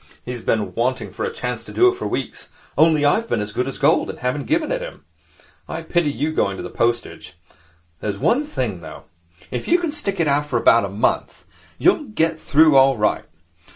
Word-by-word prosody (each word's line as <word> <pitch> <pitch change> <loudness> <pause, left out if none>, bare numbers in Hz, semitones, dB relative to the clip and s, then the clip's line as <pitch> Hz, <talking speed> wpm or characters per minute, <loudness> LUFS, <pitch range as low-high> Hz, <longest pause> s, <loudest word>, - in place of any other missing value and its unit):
He's 125 -1 -5
been 110 -1 -1
waiting 125 +2 -1
for - - -4
a 470 - -3
chance 460 - -4
to - - -11
do 370 - +4
it 370 - +3
for 380 - -5
weeks, - - -5 0.3
only 155 -2 +4
I've 220 +10 +2
been 115 - 0
as 105 0 -4
good 125 - -2
as 135 - -5
gold - - +2
and - - -6
haven't 125 +3 -2
given 315 +4 0
it - - -1
him. - - -9 0.6
I - - -5
pity 175 -4 +1
you 150 +2 -2
going 100 -10 0
into - - -6
the 90 - -9
postage. 120 0 -2 0.6
There's 100 -2 -3
one 250 - +2
thing, 120 - -3
though. 80 -1 -10 0.5
If 125 - -4
you 345 - +4
can 345 -4 -2
stick 205 -11 -3
it 145 -3 +2
for 150 - -1
about - - +4
a - - -5
month, - - -1 0.3
you'll 360 -4 +3
get 165 - -1
through 155 -1 +4
all 135 -1 +5
right. 105 0 0
145 Hz, 210 wpm, -21 LUFS, -, 0.6 s, all